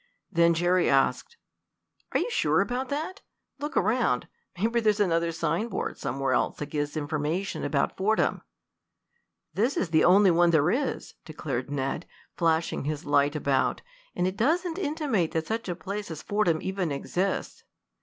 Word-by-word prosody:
Then 170 Hz, -2 st, +4 dB
Jerry 175 Hz, +2 st, +2 dB
asked: 140 Hz, -, +1 dB, 0.7 s
"Are -, -, +2 dB
you 485 Hz, -, -2 dB
sure -, -, +2 dB
about 250 Hz, +1 st, -1 dB
that? 315 Hz, +7 st, -4 dB, 0.4 s
Look 295 Hz, +1 st, -4 dB
around. 215 Hz, -, +1 dB, 0.3 s
Maybe 230 Hz, +5 st, +1 dB
there's 215 Hz, -2 st, +2 dB
another 170 Hz, -4 st, +2 dB
sign 165 Hz, +6 st, -1 dB
board 205 Hz, -, -4 dB
somewhere 135 Hz, -1 st, -1 dB
else -, -, 0 dB
that 150 Hz, -1 st, -6 dB
gives 145 Hz, 0 st, -2 dB
information 155 Hz, +5 st, -2 dB
about 140 Hz, -1 st, 0 dB
Fordham." 215 Hz, +3 st, +1 dB, 1.1 s
"This 240 Hz, +7 st, +1 dB
is 170 Hz, -, -1 dB
the 160 Hz, -, +4 dB
only 190 Hz, +1 st, +6 dB
one 175 Hz, +1 st, +4 dB
there 160 Hz, 0 st, +3 dB
is," 270 Hz, +2 st, -2 dB
declared 140 Hz, -5 st, -4 dB
Ned, 140 Hz, +3 st, -3 dB, 0.3 s
flashing 165 Hz, -4 st, 0 dB
his 150 Hz, 0 st, -3 dB
light 145 Hz, 0 st, +2 dB
about, 140 Hz, -3 st, 0 dB, 0.3 s
"and 180 Hz, -, 0 dB
it 185 Hz, +2 st, -2 dB
doesn't 335 Hz, -, +1 dB
intimate 285 Hz, -, 0 dB
that 160 Hz, -1 st, -1 dB
such 225 Hz, 0 st, -3 dB
a 175 Hz, -, -2 dB
place 200 Hz, +3 st, -5 dB
as 160 Hz, -2 st, -7 dB
Fordham 180 Hz, -6 st, +1 dB
even 190 Hz, -4 st, -2 dB
exists." 185 Hz, +7 st, -2 dB
175 Hz, 155 wpm, -27 LUFS, 150-220 Hz, 1.1 s, only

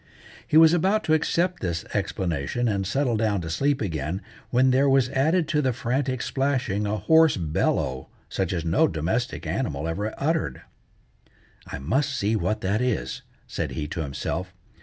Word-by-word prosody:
He 155 Hz, -, +3 dB
was 160 Hz, 0 st, +8 dB
about 190 Hz, +5 st, +2 dB
to 160 Hz, -, +2 dB
accept 170 Hz, +3 st, +1 dB
this 85 Hz, -3 st, -2 dB
explanation 90 Hz, -, -1 dB
and 100 Hz, -3 st, -1 dB
settle 125 Hz, +1 st, +1 dB
down 105 Hz, -3 st, +1 dB
to 80 Hz, -1 st, -5 dB
sleep 140 Hz, -, +1 dB
again, 85 Hz, 0 st, -3 dB, 0.3 s
when 130 Hz, +1 st, +3 dB
there 135 Hz, +2 st, +3 dB
was 135 Hz, -2 st, +3 dB
added 160 Hz, +6 st, +2 dB
to 150 Hz, -, +2 dB
the 130 Hz, -3 st, +1 dB
frantic 130 Hz, +1 st, -1 dB
splashing 130 Hz, -7 st, 0 dB
a 105 Hz, +1 st, -1 dB
hoarse 160 Hz, +8 st, +4 dB
bellow 75 Hz, -5 st, -1 dB, 0.2 s
such 95 Hz, -3 st, -2 dB
as 85 Hz, -3 st, -2 dB
no 80 Hz, -, +3 dB
domestic 100 Hz, -, -2 dB
animal 80 Hz, -, -2 dB
ever 105 Hz, +6 st, -2 dB
uttered. 160 Hz, +3 st, -1 dB, 1.0 s
"I -, -, -5 dB
must 135 Hz, -, 0 dB
see 105 Hz, +3 st, +1 dB
what 105 Hz, +2 st, -1 dB
that 100 Hz, +5 st, 0 dB
is," 125 Hz, -4 st, -1 dB, 0.2 s
said -, -, -4 dB
he 75 Hz, -2 st, -3 dB
to -, -, -5 dB
himself. 85 Hz, +6 st, -4 dB
110 Hz, 165 wpm, -25 LUFS, 90-140 Hz, 1.0 s, was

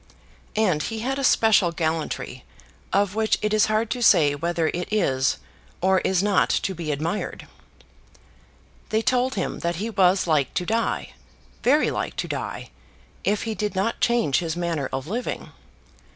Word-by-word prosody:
And 190 Hz, -8 st, +2 dB
he 220 Hz, +6 st, -4 dB
had 270 Hz, +3 st, -2 dB
a -, -, -2 dB
special 215 Hz, -8 st, +4 dB
gallantry 160 Hz, -, -3 dB, 0.5 s
of 200 Hz, -1 st, +2 dB
which 220 Hz, 0 st, +1 dB
it 210 Hz, 0 st, +1 dB
is 215 Hz, 0 st, +4 dB
hard 215 Hz, +1 st, 0 dB
to 250 Hz, -, -2 dB
say 150 Hz, -10 st, +5 dB
whether 165 Hz, +2 st, -1 dB
it 175 Hz, +3 st, -4 dB
is 135 Hz, -10 st, +1 dB, 0.4 s
or 190 Hz, +1 st, +3 dB
is 185 Hz, 0 st, +1 dB
not 205 Hz, -2 st, +3 dB
to 190 Hz, -, 0 dB
be 165 Hz, -3 st, -4 dB
admired. 160 Hz, +8 st, -3 dB, 1.4 s
They 220 Hz, +1 st, +1 dB
told 255 Hz, +2 st, +1 dB
him 190 Hz, -, -2 dB
that 170 Hz, 0 st, -1 dB
he 215 Hz, +7 st, -3 dB
was 190 Hz, -2 st, +3 dB
like 155 Hz, -5 st, +1 dB
to 180 Hz, -, 0 dB
die, 225 Hz, +4 st, -1 dB, 0.5 s
very 290 Hz, +5 st, +3 dB
like -, -, -3 dB
to -, -, -3 dB
die, -, -, -5 dB, 0.5 s
if 205 Hz, +1 st, +1 dB
he 225 Hz, -, -2 dB
did 210 Hz, -2 st, -3 dB
not 195 Hz, +5 st, -1 dB
change 235 Hz, -, +2 dB
his 165 Hz, -2 st, -3 dB
manner 165 Hz, -5 st, -2 dB
of 135 Hz, 0 st, -3 dB
living. 230 Hz, +9 st, -4 dB
190 Hz, 165 wpm, -24 LUFS, 165-220 Hz, 1.4 s, say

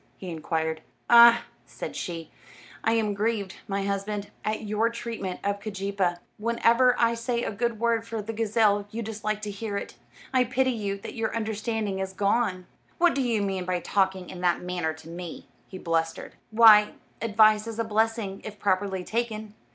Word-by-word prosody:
he 185 Hz, -2 st, -7 dB
inquired. 160 Hz, 0 st, -2 dB, 0.3 s
"Ah," 235 Hz, 0 st, +9 dB, 0.2 s
said -, -, -7 dB
she, 170 Hz, -4 st, -5 dB, 0.5 s
"I 225 Hz, -, +2 dB
am 220 Hz, -2 st, +1 dB
grieved, 205 Hz, -2 st, -1 dB
my 195 Hz, 0 st, -1 dB
husband, 200 Hz, +1 st, -3 dB
at 215 Hz, +1 st, -2 dB
your 215 Hz, +2 st, +1 dB
treatment 230 Hz, -5 st, -5 dB
of 200 Hz, 0 st, -1 dB
Keejeepaa. 195 Hz, -3 st, -1 dB, 0.2 s
Whenever 235 Hz, +2 st, +3 dB
I 230 Hz, 0 st, +3 dB
say 235 Hz, +1 st, -2 dB
a -, -, -2 dB
good 230 Hz, +1 st, -2 dB
word 230 Hz, -1 st, +1 dB
for 225 Hz, -1 st, -4 dB
the 215 Hz, +2 st, -5 dB
gazelle 215 Hz, -2 st, +2 dB
you 230 Hz, +2 st, -4 dB
dislike 215 Hz, 0 st, -3 dB
to 210 Hz, -, -3 dB
hear 205 Hz, 0 st, -4 dB
it. -, -, -7 dB, 0.4 s
I 255 Hz, -1 st, +5 dB
pity 260 Hz, +1 st, +1 dB
you 205 Hz, -4 st, -3 dB
that -, -, -7 dB
your 225 Hz, -1 st, -2 dB
understanding 220 Hz, -2 st, -2 dB
is 190 Hz, 0 st, -3 dB
gone." 200 Hz, -1 st, 0 dB, 0.3 s
"What 350 Hz, 0 st, +4 dB
do 275 Hz, -, 0 dB
you 230 Hz, -5 st, +1 dB
mean 190 Hz, -2 st, -2 dB
by 180 Hz, 0 st, -1 dB
talking 190 Hz, 0 st, 0 dB
in 180 Hz, -, -8 dB
that 175 Hz, -1 st, +2 dB
manner 175 Hz, -3 st, -2 dB
to 160 Hz, -, -14 dB
me?" 170 Hz, 0 st, -8 dB, 0.2 s
he 190 Hz, -, -9 dB
blustered. 165 Hz, -2 st, -2 dB, 0.2 s
"Why, 215 Hz, -2 st, +7 dB, 0.3 s
advice 215 Hz, -1 st, +4 dB
is 225 Hz, -1 st, -5 dB
a 230 Hz, -, +1 dB
blessing, 220 Hz, -2 st, 0 dB
if 215 Hz, -1 st, -8 dB
properly 190 Hz, -1 st, 0 dB
taken. 220 Hz, -1 st, -3 dB
210 Hz, 175 wpm, -26 LUFS, 190-230 Hz, 0.5 s, Ah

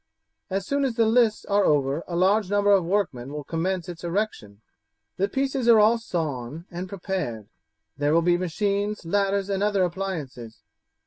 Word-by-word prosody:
As 195 Hz, 0 st, -2 dB
soon 280 Hz, +4 st, 0 dB
as 260 Hz, -4 st, -1 dB
the 230 Hz, -1 st, +3 dB
lists 225 Hz, -1 st, +2 dB
are 205 Hz, 0 st, +2 dB
over 145 Hz, 0 st, +1 dB
a 175 Hz, -, -4 dB
large 190 Hz, +3 st, +2 dB
number 205 Hz, 0 st, +3 dB
of 195 Hz, -3 st, +5 dB
workmen 165 Hz, -9 st, -1 dB
will 150 Hz, 0 st, -5 dB
commence 175 Hz, +3 st, -2 dB
its 175 Hz, -1 st, -8 dB
erection; 170 Hz, -, -3 dB, 0.6 s
the 195 Hz, -, +1 dB
pieces 270 Hz, -1 st, -1 dB
are 225 Hz, -2 st, +8 dB
all 220 Hz, +3 st, +4 dB
sawn 155 Hz, -, -4 dB
and 180 Hz, +2 st, -6 dB
prepared. 180 Hz, -, -4 dB, 0.5 s
There 145 Hz, 0 st, +2 dB
will 165 Hz, +1 st, +3 dB
be 175 Hz, 0 st, +3 dB
machines, 200 Hz, +3 st, -1 dB
ladders, 195 Hz, +2 st, 0 dB
and 195 Hz, -1 st, -1 dB
other 205 Hz, -2 st, +2 dB
appliances. 165 Hz, -11 st, -5 dB
190 Hz, 170 wpm, -25 LUFS, 165-205 Hz, 0.6 s, are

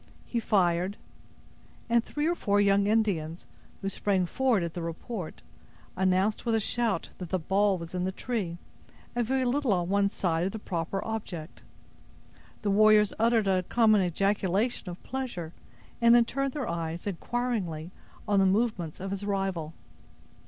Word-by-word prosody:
He 235 Hz, -, -1 dB
fired; 185 Hz, -2 st, +1 dB, 0.9 s
and 235 Hz, 0 st, +3 dB
three 295 Hz, +4 st, -3 dB
or 340 Hz, -, +3 dB
four 205 Hz, -11 st, +1 dB
young 200 Hz, 0 st, +4 dB
Indians, 190 Hz, -7 st, 0 dB, 0.4 s
who 195 Hz, -, 0 dB
sprang 195 Hz, -2 st, +1 dB
forward 240 Hz, 0 st, +1 dB
at 170 Hz, -1 st, -4 dB
the 175 Hz, -, -4 dB
report, 170 Hz, +3 st, -6 dB, 0.5 s
announced 190 Hz, +3 st, +1 dB
with 230 Hz, -2 st, +1 dB
a -, -, +3 dB
shout, 220 Hz, -3 st, -1 dB
that 180 Hz, -3 st, -6 dB
the 185 Hz, -, +1 dB
ball 195 Hz, +3 st, +2 dB
was 170 Hz, 0 st, -8 dB
in 180 Hz, 0 st, -1 dB
the 190 Hz, -, 0 dB
tree, 195 Hz, -5 st, -3 dB, 0.6 s
a 240 Hz, -, +1 dB
very 260 Hz, +2 st, +1 dB
little 265 Hz, 0 st, +1 dB
on 175 Hz, -1 st, 0 dB
one 200 Hz, 0 st, +3 dB
side 170 Hz, -4 st, 0 dB
of 195 Hz, -, -5 dB
the -, -, -3 dB
proper 180 Hz, -2 st, -3 dB
object. 190 Hz, -8 st, -5 dB, 1.0 s
The 205 Hz, -, +1 dB
warriors 210 Hz, 0 st, +5 dB
uttered 225 Hz, -2 st, +3 dB
a 190 Hz, -1 st, +3 dB
common 215 Hz, +2 st, +4 dB
ejaculation 195 Hz, +4 st, 0 dB
of 175 Hz, -, -9 dB
pleasure, 240 Hz, -12 st, -4 dB, 0.5 s
and 235 Hz, 0 st, +7 dB
then 240 Hz, -1 st, +6 dB
turned 275 Hz, +2 st, -2 dB
their 285 Hz, -4 st, -3 dB
eyes, 170 Hz, 0 st, -3 dB
inquiringly, 195 Hz, -5 st, -2 dB, 0.4 s
on 205 Hz, -1 st, +3 dB
the 195 Hz, -, +5 dB
movements 195 Hz, -5 st, 0 dB
of 195 Hz, +1 st, -4 dB
his 195 Hz, 0 st, -3 dB
rival. 195 Hz, -6 st, -2 dB
200 Hz, 160 wpm, -28 LUFS, 175-225 Hz, 1.0 s, and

